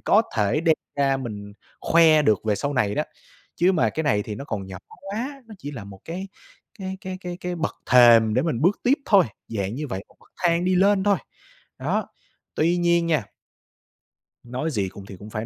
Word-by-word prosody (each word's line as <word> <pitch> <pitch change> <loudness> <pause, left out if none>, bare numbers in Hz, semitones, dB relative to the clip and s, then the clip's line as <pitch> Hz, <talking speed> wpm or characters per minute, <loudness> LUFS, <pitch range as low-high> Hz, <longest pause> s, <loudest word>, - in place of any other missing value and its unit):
có - - +4
thể 105 +7 +2
đem 165 -1 +4 0.2
ra 135 -1 +3
mình 105 -6 -7 0.3
khoe 160 -2 +5
được 110 -8 +3
về 110 -1 +2
sau 140 +7 -2
này 105 -5 +1
đó. - - +1 0.5
Chứ 180 +3 +3
mà 170 - +2
cái 160 - -2
này 115 -8 +2
thì 105 - -6
nó 110 - -7
còn 105 -8 -4
nhỏ 95 -1 -8
quá, 235 +9 -6
nó 220 - -10
chỉ 145 - -7
là 125 -8 -8
một 100 -1 -12
cái 185 +4 -6 0.5
cái 190 -1 -5
cái 185 -2 -6
cái 180 -1 -6
cái 180 0 -3
bậc 165 -1 -2 0.2
thềm 115 -3 +7
để 130 - +2
mình 150 -7 -1
bước 185 +5 +2
tiếp 255 - +4
thôi, 200 -4 +6 0.2
dạng 100 -2 -3
như 150 +4 -4
vậy, 95 -4 -5
một - - -24
bậc - - -24
thang 170 0 +2
đi 185 0 +2
lên 195 +1 +3
thôi. 205 -1 +4 0.6
Đó, - - -1 0.5
tuy 170 +3 +2
nhiên 170 -1 +2
nha 155 -8 +1 1.2
nói 130 +6 -3
gì 100 -8 -1
cùng 100 +1 -11
thì 100 - -10
cũng 105 - -10
phải 110 +1 -4
150 Hz, 215 wpm, -24 LUFS, 110-180 Hz, 1.2 s, thềm